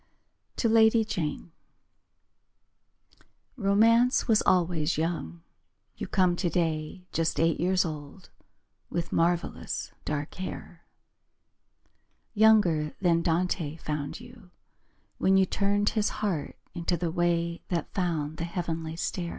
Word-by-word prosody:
To 235 - +1
Lady 225 0 +5
Jane 170 -5 -4 2.0
Romance 230 +3 +3
was 220 -3 +4
always 170 -4 +2
young. 155 - -3 0.5
You - - -5
come 180 -2 +2
today 170 -1 -2
Just 165 0 -1
eight 165 0 +2
years 185 +1 +2
old 155 +3 -8 0.6
With 170 0 -3
marvellous 170 +1 -1
dark 150 0 -3
hair. 185 -2 -7 1.5
Younger 205 -9 +4
than 170 -3 +2
Dante 165 -2 0
found 150 -1 -4
you 240 -5 -14 0.7
When 190 0 +4
you 190 - +5
turned 205 +2 +1
His 215 -2 0
heart 190 -9 -3 0.2
into 170 0 -1
the 165 0 -2
way 170 -1 0
That 170 -4 -3
found 160 -5 -2
the 165 - -3
heavenly 165 -2 -4
stair. 170 +1 -3
175 Hz, 110 wpm, -28 LUFS, 160-195 Hz, 2.0 s, Lady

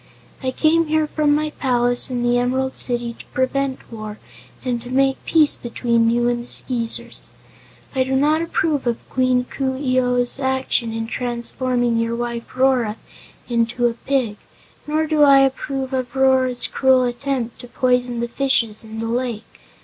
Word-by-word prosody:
I 260 - -1
came 320 +4 +2
here 310 0 +2
from 300 -1 +1
my 305 0 -1
palace 245 -3 +1
in 245 -1 -2
the 240 0 +2
Emerald 260 +2 -1
City 240 -1 0
to - - -11
prevent 260 -1 -2
war 215 -1 -7 0.5
and 245 -2 -1
to 245 - -10
make 270 +1 +1
peace 310 -3 +4
between 235 -1 0
you 240 +1 +1
and 240 0 0
the 240 - -11
Skeezers. 235 -3 +2 0.6
I 260 -1 +2
do 265 +1 -2
not 300 +4 +2
approve 315 -5 -1
of 235 -1 -2
Queen 255 -1 +2
Coo 265 0 -3
ee 255 -2 +1
oh's 245 +1 +1
action 265 -3 0
in 225 0 -3
transforming 240 0 -1
your 230 0 -1
wife 235 0 -5
Rora 255 -5 +2 0.5
into 235 0 0
a 235 - +2
pig, 240 -3 -1 0.5
nor 310 +1 +1
do 310 -1 +1
I 275 -2 +7
approve 270 0 -1
of 255 0 -3
Rora's 260 -2 +2
cruel 260 -1 +3
attempt 245 -1 -3
to 245 - -10
poison 250 -1 0
the 235 - -1
fishes 235 -4 0
in 220 0 -9
the 225 0 -3
lake. 235 - -4
255 Hz, 165 wpm, -20 LUFS, 240-270 Hz, 0.6 s, I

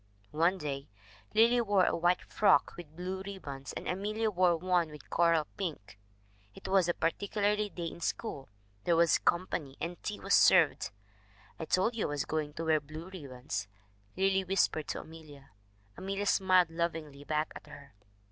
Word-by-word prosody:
"One 170 +5 +2
day 140 -4 -5 0.5
Lily 235 +2 +5
wore 205 -5 +3
a - - +1
white 175 +2 +2
frock 210 - +3
with 160 -3 -11
blue 185 +2 -4
rib 195 -1 -8
bons, 135 -2 -7
and - - -6
Amelia 215 +4 -1
wore 180 -3 +3
one 175 -1 +1
with 150 -1 -13
coral 165 -2 +3
pink. 105 - -5 0.6
It - - -9
was 190 -2 +3
a 175 - +1
particular 205 +4 0
day 210 0 -2 0.2
in 170 +1 -6
school; 140 - -3 0.3
there 170 - +3
was 170 -1 +4
company, 165 -6 -1
and 170 +2 -5
tea 210 - -4
was 195 - -1
served. 170 -6 +5 0.3
" 100 -1 -28
'I 160 - -3
told 190 +8 +1
you 225 - -1
I - - -6
was 145 -1 -2
going 155 -1 -2
to 165 +2 -5
wear 160 -1 +3
blue 155 +5 -9
ribbons/ 125 - -5 0.5
Lily 190 0 +2
whispered 185 -5 +1
to - - -3
Amelia. 150 -4 -13 0.4
Amelia 195 +1 -3
smiled 185 -4 +4
lovingly 165 -4 -3
back 155 +1 -1
at - - -10
her. 140 -1 -13
170 Hz, 175 wpm, -31 LUFS, 150-190 Hz, 0.6 s, Lily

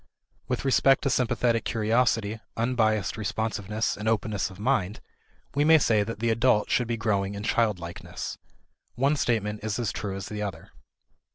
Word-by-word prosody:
With 125 +1 -2
respect 135 0 +4
to 135 - +1
sympathetic 120 -2 +1
curiosity, 110 -1 +1 0.2
unbiased 110 -4 +1
responsiveness, 110 0 -2
and 105 +2 -2
openness 105 -3 0
of 95 - -13
mind, 105 -4 0 0.5
we 145 - +2
may 160 +1 +7
say 110 -7 +3
that 110 +2 -3
the 115 0 +1
adult 115 -1 +2
should 125 - +2
be 115 0 -1
growing 100 -3 0
in 100 - -6
childlikeness. 100 -7 -2 0.6
One 140 +4 +2
statement 105 -6 -1
is 110 -1 -2
as 120 -4 -1
true 100 -2 -4
as 95 - -5
the 105 0 -5
other. 95 -6 -6
110 Hz, 160 wpm, -27 LUFS, 105-120 Hz, 0.6 s, may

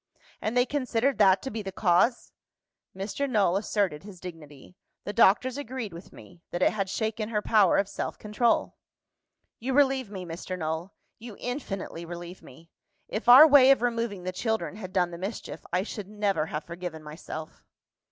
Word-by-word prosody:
"And 220 +3 -1
they 245 - +5
considered 255 -2 0
that 190 -2 +5
to 265 - -4
be 220 0 -4
the 195 -1 -6
cause 190 +5 +2 0.3
?" - - -28
Mr. 215 +9 -3
Null 200 -7 +2
asserted 200 -6 -1
his 195 -3 -12
dignity. 160 -3 -11 0.3
"The 205 - -5
doctors 250 +8 +4
agreed 245 -7 -5
with 170 +3 -11
Me, 175 -1 -15
that 175 +1 -1
it - - +4
had 195 -3 -2
shaken 220 +1 -2
her 210 -2 -1
power 210 -5 +4
of 200 - +1
self 200 - -5
control." 215 +2 0 0.9
"You 260 +3 -2
relieve 265 -4 +2
me, 190 -3 -7
Mr. 175 +2 -6
Null 160 +2 -3 0.3
you 225 -2 -10
infinitely 200 - -5
relieve 175 +2 -8
me! 165 0 -16 0.4
If 220 +3 -2
our 260 +5 +11
way 275 -3 +7
of 270 -3 +5
removing 230 -5 -1
the 185 - -3
children 220 +1 -2
had 185 -4 -8
done 180 -2 +1
the 170 - -8
mischief, 195 +4 -6
I 180 +2 +1
should 210 -2 -7
never 205 -6 -1
have 150 0 -4
forgiven 170 -2 -7
myself." 155 +1 -9
200 Hz, 180 wpm, -27 LUFS, 180-230 Hz, 0.9 s, our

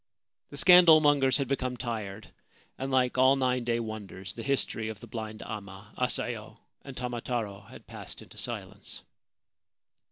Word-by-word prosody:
The - - -9
scandal 175 -3 +8
mongers 140 -4 +4
had 140 -2 -1
become 130 -2 -1
tired, 110 -4 -5 0.4
and, 135 +1 -4
like 130 -1 +2
all 130 +1 +6
nine 125 -2 +1
day 120 0 0
wonders, 105 -3 -6
the 115 - -7
history 115 -4 -1
of 110 -2 -7
the - - -10
blind 110 -1 -6
amma, 100 -1 -8
Asayo, 115 -3 -2 0.2
and 135 -2 -10
Tamataro 120 -4 -3
had - - -13
passed - - -8
into - - -12
silence. - - -6
120 Hz, 150 wpm, -29 LUFS, 110-130 Hz, 0.4 s, scandal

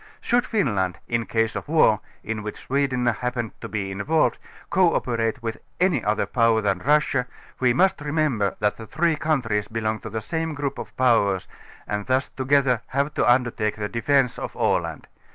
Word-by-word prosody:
Should 245 +1 +1
Finland, 105 - 0
in 115 -1 -1
case 115 -1 0
of - - -5
war, 150 -10 +4 0.2
in 110 0 -3
which 105 0 -7
Sweden 135 -2 0
happen 120 0 0
ed - - -37
to - - -6
be 100 -3 -3
involved, 145 +12 +1 0.3
cooperate 125 -9 +1
with 115 -1 -3 0.2
any 180 - +2
other 105 +2 +1
power 115 -2 +3
than 100 -3 0
Russia, 135 -1 +2 0.3
we 125 -2 +4
must 180 +6 +2
remember 145 - 0
that 105 0 +1
the 110 - -9
three 160 +7 +1
countries 125 -10 0
belong 110 -1 -2
to 110 - -7
the 110 +1 -3
same 160 +7 -3
group 145 -1 -3
of - - -9
powers, 110 -7 +3 0.4
and 105 -1 -3
thus 130 +1 +1
together 130 -3 +2
have 140 +3 -1
to - - +3
under 120 -1 +3
take 105 -2 -1
the 105 -1 -3
defence 125 +3 +1
of - - -6
Aland. - - 0
120 Hz, 180 wpm, -24 LUFS, 110-145 Hz, 0.4 s, war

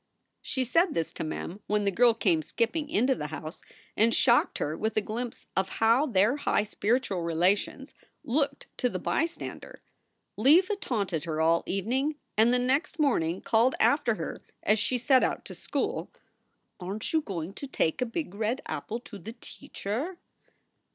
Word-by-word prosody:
She 260 - -1
said 330 +8 +2
this 165 -1 -1
to - - -4
Mem 165 +4 -5
when 210 0 +1
the 200 - +1
girl 235 +3 +4
came 175 -8 +2
skipping 240 - -1
into 260 -1 +3
the 150 - -4
house, 155 +2 -7 0.3
and 230 +2 +3
shocked 240 -2 +3
her 150 +2 -2
with 220 +5 -2
a - - +4
glimpse 230 +3 -5
of 190 0 +1
how 230 +7 +4
their 220 +3 +3
high 245 - +1
spiritual 210 -2 0
relations 180 - 0 0.3
looked 280 +1 0
to 250 - +2
the - - -3
bystander. 330 +1 -3 0.5
Leva 335 - +5
taunted 200 - -2
her 160 -2 -2
all 165 +1 +3
evening, 255 +10 0 0.2
and 225 +3 +5
the 250 - +4
next 270 +8 0
morning 190 - +1
called 230 +4 +3
after 250 -6 +3
her, - - -5 0.2
as 210 +1 +3
she 250 - +1
set 260 +2 +4
out - - -1
to - - -8
school: - - -3 0.7
"Aren 190 +3 -4
t 220 - -3
you 320 - +4
going 185 - -5
to 280 - -7
take 165 -6 0
a - - +2
big 230 - -4
red 220 +5 -1
apple 230 - -4
to 210 -4 -10
teacher?" 230 - -6
225 Hz, 170 wpm, -28 LUFS, 195-265 Hz, 0.7 s, Leva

